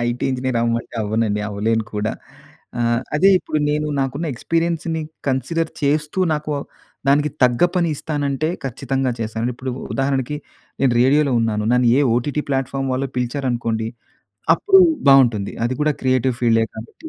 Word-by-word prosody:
IT 120 +1 -2
engineer 130 -1 -1
అవ్వమంటే 115 0 -1
అవ్వనండి, 105 0 0
అవ్వలేను 110 +2 0
కూడా. 105 +1 -1 0.7
ఆహ్, 115 0 +2 0.2
అదే 195 +5 +5
ఇప్పుడు 155 - -2
నేను, 150 +1 0
నాకున్న 135 +5 -2
ఎక్స్పీరియన్స్‌ని 165 +3 -1 0.3
కన్సిడర్ 160 +6 -1
చేస్తూ, 150 +4 0 0.2
నాకు 150 0 -3 0.6
దానికి 145 +1 +3
తగ్గ 120 +4 +3
పని 170 -2 +2
ఇస్తానంటే 145 0 -2 0.2
ఖచ్చితంగా 135 0 -1
చేస్తాను. 110 +2 -2
ఇప్పుడు 130 +1 -5 0.2
ఉదాహరణకి, 135 +1 -1 0.4
నేను 135 -3 +3
రేడియోలో 140 +2 +3
ఉన్నాను. 105 -2 0
నన్ను 125 -1 +3
ఏ - - +4
ఓటీటీ 145 +5 -1
ప్లాట్‌ఫార్మ్ 135 0 -1
వాళ్ళు 135 +1 -2
పిలిచారనుకోండి, 120 -3 -1 0.7
అప్పుడు 385 - +5 0.3
బాగుంటుంది. 120 -7 +4
అది 130 - -2
కూడా 150 0 +2
క్రియేటివ్ 130 -1 +1
ఫీల్డే 115 -1 +4
కాబట్టి, 115 - -10
130 Hz, 135 wpm, -20 LUFS, 115-150 Hz, 0.7 s, అదే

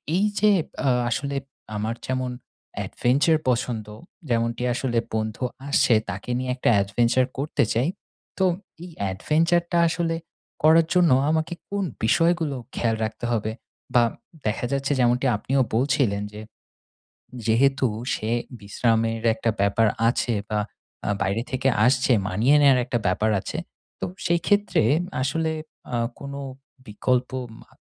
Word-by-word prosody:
এই 195 +3 +3
যে 210 0 +5 0.4
আ - - +5 0.2
আসলে 140 +3 -2 0.4
আমার 110 +2 -2
যেমন 130 -1 -1 0.5
adventure 145 +6 +2
পছন্দ। 120 -3 -1 0.4
যেমনটি 115 0 0
আসলে 120 -1 -1 0.2
বন্ধু 110 +2 -2 0.3
আসে, 125 -4 +4
তাকে 95 +5 -6
নিয়ে 130 0 -2
একটা 130 - +1
adventure 120 +6 +2
করতে 145 +3 0
চাই, 125 +7 +1 0.5
তো 190 - +3 0.4
এই 180 - -9 0.2
adventure 165 - +2
টা 175 - +2
আসলে 165 0 -1 0.5
করার 160 +1 +6
জন্য 180 -4 +4 0.2
আমাকে 160 +2 0 0.2
কোন 200 0 -1 0.2
বিষয়গুলো 165 +3 +2 0.2
খেয়াল 115 -1 +1
রাখতে 110 +2 -6
হবে? 110 -2 0 0.4
বা 120 - +7 0.4
দেখা 110 +3 -1
যাচ্ছে, 140 +1 -1
যেমনটি 125 +2 +3
আপনিও 135 +6 0
বলছিলেন 125 -5 +1
যে, 105 - -7 1.1
যেহেতু 135 +4 +3 0.3
সে 110 - -3 0.3
বিশ্রামের 115 +2 0
একটা 115 +1 0
ব্যাপার 100 +3 +3 0.2
আছে 120 0 0 0.2
বা 105 - 0 0.5
আ - - -1
বাইরে 100 +4 0
থেকে 130 0 0 0.2
আসছে, 130 0 +3 0.2
মানিয়ে 115 +10 +3
নেওয়ার 135 -3 +6
একটা 120 -1 -1
ব্যাপার 105 +4 +1
আছে। - - -5 0.4
তো - - -1 0.2
সেই 170 -1 +2
ক্ষেত্রে 205 - +3 0.4
আসলে 160 +4 0 0.4
আ - - +2 0.2
কোনো 140 0 -6 0.5
বিকল্প 125 +4 0 0.3
মা - - -20
125 Hz, 135 wpm, -24 LUFS, 115-150 Hz, 1.1 s, বা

